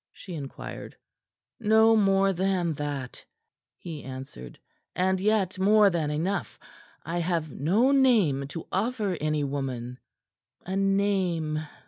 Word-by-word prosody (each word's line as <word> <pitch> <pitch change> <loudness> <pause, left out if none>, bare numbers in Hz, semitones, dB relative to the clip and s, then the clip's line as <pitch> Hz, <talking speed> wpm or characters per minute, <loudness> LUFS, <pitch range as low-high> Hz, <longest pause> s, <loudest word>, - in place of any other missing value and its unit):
she 185 - -10
inquired. 140 -4 -8 0.6
"No 220 0 +5
more 195 -2 +3
than 180 -2 0
that," 145 -4 -5 0.5
he 160 -4 -8
answered, 130 - -9 0.4
"and 190 +1 +1
yet 195 -2 +1
more 205 +1 +5
than 160 -4 -1
enough. 170 +7 -2 0.5
I 175 +1 -2
have 165 -3 -1
no 200 - +2
name 215 - +3
to 160 +3 -7
offer 210 -1 -1
any 150 -1 0
woman." 130 -3 -4 0.7
"A 190 - -3
name?" 190 -6 0
180 Hz, 115 wpm, -27 LUFS, 150-200 Hz, 0.7 s, No